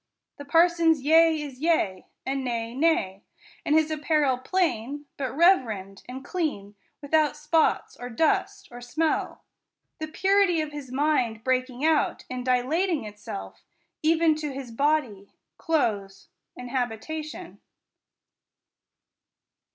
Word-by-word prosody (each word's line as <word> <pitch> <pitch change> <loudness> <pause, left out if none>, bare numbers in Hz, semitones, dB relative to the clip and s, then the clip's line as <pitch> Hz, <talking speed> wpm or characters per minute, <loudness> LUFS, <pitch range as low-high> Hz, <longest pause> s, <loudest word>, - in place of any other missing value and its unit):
The 285 - -9
parson's 330 -1 +3
yea 320 +1 +5
is 280 -4 -7
yea, 285 - 0 0.2
and 270 0 -2
nay, 230 -2 -3
nay: 250 - +1 0.4
and 300 - +2
his 315 0 +3
apparel 295 -4 +1
plain, 290 -3 -1
but 265 -3 -3
reverend, 225 - +2
and 260 +2 -8
clean, 290 - -3 0.3
without 300 0 +2
spots, 300 +1 +1
or 245 - -7
dust, 385 - 0
or 245 0 -10
smell; 310 +7 -2 0.6
the 315 - -4
purity 385 +1 +2
of 310 -1 -3
his 290 -4 -8
mind 255 -6 0
breaking 255 +2 -1
out, 320 -2 +1
and 250 0 -4
dilating 280 - +1
itself 205 - -8 0.4
even 320 0 +3
to 300 -2 -4
his 265 -3 -7
body, 250 -7 -1 0.2
clothes, 210 - -1 0.3
and 250 -1 -8
habita 250 +5 -2
tion. 305 - -10
285 Hz, 120 wpm, -26 LUFS, 245-320 Hz, 0.6 s, yea